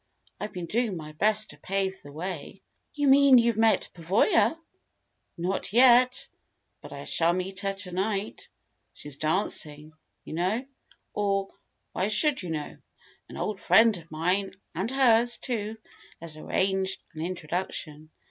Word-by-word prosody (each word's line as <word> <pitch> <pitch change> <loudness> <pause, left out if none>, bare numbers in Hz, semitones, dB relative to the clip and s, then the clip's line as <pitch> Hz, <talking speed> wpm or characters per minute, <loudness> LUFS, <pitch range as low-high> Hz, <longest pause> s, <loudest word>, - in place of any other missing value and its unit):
I've 210 0 -5
been 180 -3 -5
doing 220 +1 -1
my 155 -1 -8
best 215 +7 +1
to - - -14
pave 190 0 -2
the 145 - -12
way." 170 +2 -6 0.3
"You 290 -1 +1
mean 275 -1 +7
you've 235 -1 +3
met 225 -1 +3
Pavoya?' 210 - +2 0.8
"Not 185 +3 -2
yet. 250 +2 +5 0.5
But - - -11
I - - -7
shall 170 +1 +2
meet 185 +1 -3
her 195 0 -1
to 195 -2 -6
night. 195 +3 -3 0.5
She's 145 -2 -9
dancing, 155 -2 -2 0.3
you - - -8
know. 190 +10 -1 0.5
Or 195 -1 0 0.4
why 190 - -1
should 265 +6 +2
you 180 - -6
know? 155 -2 -4 0.5
An - - -9
old 210 -2 -3
friend 225 -1 +5
of 165 -2 -10
mine 180 +5 -1 0.2
and 190 +7 -2
hers, 240 -3 +3
too 220 -3 -3 0.4
has 165 -2 -5
arranged 190 +4 -1
an 155 - -7
introduction. 165 -3 -4
195 Hz, 145 wpm, -27 LUFS, 170-225 Hz, 0.8 s, mean